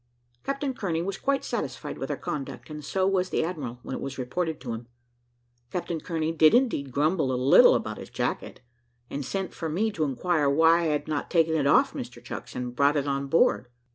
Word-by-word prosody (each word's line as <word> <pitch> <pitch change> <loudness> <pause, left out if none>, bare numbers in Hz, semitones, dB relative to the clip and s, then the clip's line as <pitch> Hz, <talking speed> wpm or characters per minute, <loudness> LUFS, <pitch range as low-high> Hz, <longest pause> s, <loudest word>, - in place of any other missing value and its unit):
Captain 275 0 -2
Kearney 170 -8 -2
was 195 +1 -4
quite 275 0 0
satisfied - - -4
with - - -4
our - - -2
conduct, 145 +1 -6
and 150 0 -7
so 190 +6 0
was 190 -1 +1
the - - 0
admiral, 150 -8 -4
when - - -6
it - - -6
was 135 0 -5
reported 160 +6 -2
to 120 -3 -5
him. 115 +1 -7 0.8
Captain 170 -1 -3
Kearney 160 -2 -2
did 160 +3 +5
indeed 230 - +1
grumble 150 +1 +1
a 125 - 0
little 130 +2 +7
about - - -3
his - - -9
jacket, - - -3 0.5
and 140 - -3
sent 190 +6 -3
for 165 - -4
me 210 +8 0
to 165 -6 -2
inquire 145 +2 +1
why 160 +4 +5
I 170 - -1
had 150 -1 0
not 150 -2 -2
taken 165 -2 +3
it 150 -3 +2
off - - +4
Mr - - -7
Chucks, - - -7
and 125 -1 -4
brought 140 +2 +3
it 140 - 0
on 140 0 -1
board. 135 -4 +3
155 Hz, 210 wpm, -27 LUFS, 140-180 Hz, 0.8 s, little